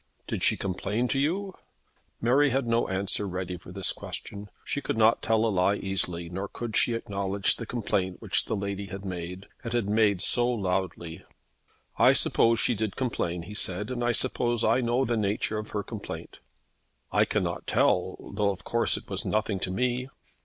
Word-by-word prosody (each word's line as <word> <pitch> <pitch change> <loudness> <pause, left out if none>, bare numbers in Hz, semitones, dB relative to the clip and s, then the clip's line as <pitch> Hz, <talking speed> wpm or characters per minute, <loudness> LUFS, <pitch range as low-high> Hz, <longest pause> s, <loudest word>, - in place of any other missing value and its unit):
"Did - - -4
she - - +4
complain 100 +5 -2
to 135 - 0
you?" 185 +7 -1 0.7
Mary 135 +5 +3
had 135 0 0
no 115 0 +1
answer 100 +2 0
ready 90 -1 -4
for 90 0 -12
this 95 +1 +2
question. 100 0 -7 0.2
She 145 - -2
could 110 - -3
not 110 +1 +4
tell 110 0 +2
a - - +2
lie 100 0 +2
easily, 90 -4 -1
nor 95 +4 -4
could 115 +2 -6
she 120 - +3
acknowledge 100 -2 -1
the 115 - -7
complaint 95 -6 -2
which - - 0
the - - -2
lady 100 0 -4
had 95 +1 -8
made, 90 +1 -6 0.2
and 115 - -4
had 120 -4 0
made 105 -2 +3
so 120 +3 +6
loudly. 90 -6 -3 0.8
"I - - +7
suppose 115 0 +4
she - - +2
did 110 -2 -3
complain," 90 -9 -2
he 105 - -9
said, 105 +2 +2
"and 120 -1 -3
I 120 - +2
suppose 120 -1 +2
I 115 +4 +3
know 120 +2 +1
the 120 - 0
nature 105 +1 0
of 110 - -7
her 105 -1 -3
complaint." - - -8 0.7
"I - - +4
cannot - - -2
tell; - - +1
though, 105 -1 +1
of 95 -2 -5
course, 115 0 +2
it - - -10
was - - -2
nothing 105 -2 -1
to 95 - -2
me." 125 +5 -1
105 Hz, 190 wpm, -27 LUFS, 95-120 Hz, 0.8 s, I